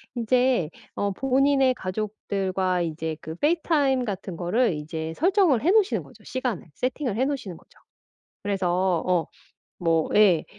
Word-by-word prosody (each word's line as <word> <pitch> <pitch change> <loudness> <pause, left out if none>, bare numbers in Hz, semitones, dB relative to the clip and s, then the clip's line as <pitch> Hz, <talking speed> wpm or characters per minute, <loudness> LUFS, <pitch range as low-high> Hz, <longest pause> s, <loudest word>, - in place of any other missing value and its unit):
인제 245 -6 +2 0.3
어 200 0 0
본인의 270 +3 +3
가족들과 190 -3 -2
이제 160 -1 -3
그 160 +1 -7
페이스타임 290 - +1
같은 195 -4 -5
거를 185 +6 +1
이제 160 +1 -5
설정을 360 - +3
해 335 - +3
놓으시는 420 -1 +3
거죠 - - -18
시간을. 250 -9 -3
세팅을 255 -3 -2
해 260 - +2
놓으시는 260 - -4
거죠. - - -23 0.7
그래서 185 -3 +1
어 175 -4 +2 0.5
뭐 165 -2 +1
예. 195 -7 +5
205 Hz, 300 characters per minute, -25 LUFS, 175-260 Hz, 0.7 s, 예